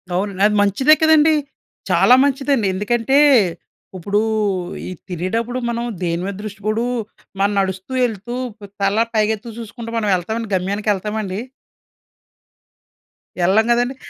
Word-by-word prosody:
అవును 195 +3 0
అండి. 190 +1 -1
అది 210 - -1
మంచిదే 205 +9 +4
కదండీ. 315 0 +5 0.6
చాలా 250 - +6
మంచిదండి. 275 -5 +1
ఎందుకంటే, 230 +7 +1 0.8
ఇప్పుడు 200 +4 0 0.7
ఈ - - -5 0.2
తినేటప్పుడు 225 +8 -2
మనం 235 0 -2 0.2
దేనిమీద 175 +3 -2
దృష్టి 210 0 -8
పోదు, 215 +2 0 0.5
మనం 200 +1 +2
నడుస్తూ 190 +3 -3
వెళ్తూ 230 0 -3 0.3
ప్ 205 - -10 0.2
తల 195 +1 +1 0.2
పైకెత్తు 220 +1 -1
చూసుకుం‌టా 230 +1 -8
మనం 220 -2 -1
వెళ్తా‌మ 185 +5 -3
అండి 225 -2 -6
గమ్యానికి 200 +3 -2
వెళ్తామండి? 205 -1 -3 2.0
ఏళ్లళ్ళేం 205 +6 +3
కదండీ. 245 +2 +1
215 Hz, 125 wpm, -19 LUFS, 195-235 Hz, 2.0 s, చాలా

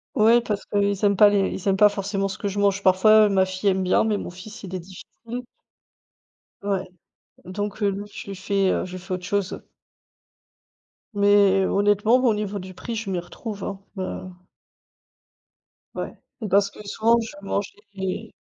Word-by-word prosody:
Ouais, 230 +3 +5
parce 210 -4 -3
qu'ils 200 0 0
aiment 200 -1 +4 0.2
les 200 -1 +2
ils 190 - -6
aiment 195 - +2
pas 210 +1 +7
forcément 195 0 -2
ce 190 - -6
que 200 - -2
je 205 +1 -4
mange, 200 0 +2
parfois 210 +3 +6
ma 190 -1 +3
fille 185 +2 -1
aime 190 0 +1
bien, 185 - +3
mais 215 -2 +1
mon - - -5
fils 205 +6 -11
il 190 -1 -6
est 185 - -2
difficile. 230 +7 -9 1.2
Ouais, 195 -2 -1 0.6
donc 205 +3 -4
heu, 200 - +3
non 200 +1 -5
je 205 - -10
lui 195 - -5
fait, 195 0 +1
heu, - - -1
je 185 - -9
lui 185 - -5
fait 185 +1 -6
autre 180 0 -4
chose. 200 -1 -2 1.5
Mais 200 -1 +4
honnêtement 205 +3 +3
au 235 - +4
niveau 210 -1 -3
du 185 0 -9
prix 230 +5 -6
je 215 -2 -4
m'y 185 - -1
retrouve, 200 +3 -7
hein. 195 -1 -5 0.2
Heu 185 -1 -4 1.7
Ouais. - - -4 0.4
Parce 200 +1 +3
que - - -16
souvent 230 +3 +3
je 225 -3 -6
mangeais 200 +1 -4
200 Hz, 175 wpm, -24 LUFS, 190-210 Hz, 1.7 s, pas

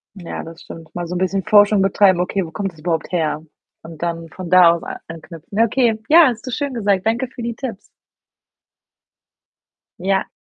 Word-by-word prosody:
Ja, 175 -3 -7
das 165 +1 -11
stimmt. 160 -1 -12
Mal 175 -1 -4
so 180 - -5
'n - - -1
bisschen 190 0 0
Forschung 205 -1 +5
betreiben, 195 -1 +3
„okay, 185 +1 -1
wo 160 - -10
kommt 195 +3 -3
das 160 - -20
überhaupt 165 0 -2
her?“ 155 -3 -1 0.4
Und 165 -1 -11
dann 165 -1 -3
von 180 +1 -8
da 180 -2 +7
aus 170 - -3
a - - -7
anknüpfen. 165 0 -11
Ne, 220 +3 +3
okay. 230 -1 +1
Ja, 325 -1 +8
hast 235 0 -3
du 255 - -5
schön 280 +2 -3
gesagt. 200 -4 0
Danke 235 +3 0
für 245 - -10
die 235 -1 -3
Tipps. 235 -7 -6 2.2
Ja. 190 +1 0
190 Hz, 195 wpm, -19 LUFS, 170-220 Hz, 2.2 s, Ja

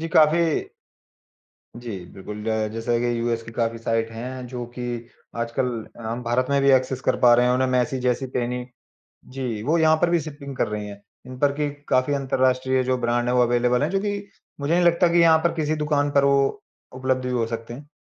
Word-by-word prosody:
जी, 165 - -3
काफ़ी 155 +2 +5 1.4
जी, 115 -5 -6
बिल्कुल 105 +2 -8 0.3
जैसा 115 +1 -1
कि 120 -1 0
यूएस 115 -1 -1
की 115 - -11
काफ़ी 115 0 -1
साइट 115 0 -1
हैं 125 +2 -6
जो 125 -1 -5
कि 125 - -6 0.6
आजकल 115 +2 -1 0.3
अ, - - -10
हम 115 +2 -4
भारत 125 +2 0
में 140 0 +3
भी 140 - +5
एक्सेस 130 0 +2
कर 130 - +1
पा 120 -1 +7
रहे 125 +1 +4
हैं। 125 - +3
उन्हें 130 +1 +1
मेसी 125 +1 +1
जैसी 125 +1 0
पेनी 125 0 -2 0.6
जी, 125 -5 -4
वो 155 +7 +2
यहाँ 160 -1 +5
पर 175 - +3
भी 175 - +3
शिपिंग 145 -3 -8
कर - - +1
रहें 105 -1 -4
हैं, 100 0 -10 0.2
इन 130 0 -9
पर 145 0 +3
कि 150 - +1 0.2
काफ़ी 130 +3 +2
अंतरराष्ट्रीय 130 -1 +1
जो 130 0 0
ब्रांड 120 0 0
हैं 125 - +1
वो 125 - +4
अवेलेबल 120 +1 +2
हैं 150 - +1
जो 195 +2 0
कि 205 0 -2 0.4
मुझे 145 +4 0
नहीं 175 - +3
लगता 170 +1 +4
कि 175 - +5
यहाँ 165 -1 +6
पर 170 - +2
किसी 155 -1 0
दुकान 150 -1 0
पर 140 -1 +3
वो 140 0 +2 0.3
उपलब्ध 130 0 -1
भी 125 - -2
हो 120 -2 +1
सकते 115 0 -6
हैं। 145 +4 -11
130 Hz, 215 wpm, -23 LUFS, 120-145 Hz, 1.4 s, पा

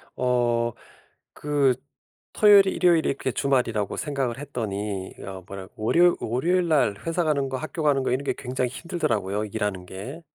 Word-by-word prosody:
어. 120 -2 +1 0.6
그 145 -3 +1 0.6
토요일이 200 -2 +6
일요일이 170 -3 +3
이렇게 135 -1 -2
주말이라고 120 -6 0
생각을 135 -5 -2
했더니 105 -8 -4
어 95 -1 -8
뭐랄 95 -1 -8
월요 170 +11 +3
월요일날 155 - +1
회사 165 +1 +1
가는 145 -4 +1
거, 130 - -3
학교 155 +3 -5
가는 140 -3 +3
거 - - 0
이런 130 +3 0
게 - - 0
굉장히 125 -1 -2
힘들더라고요 110 - -2
일하는 100 -3 -3
게. 105 - -8
130 Hz, 340 characters per minute, -25 LUFS, 105-150 Hz, 0.6 s, 토요일이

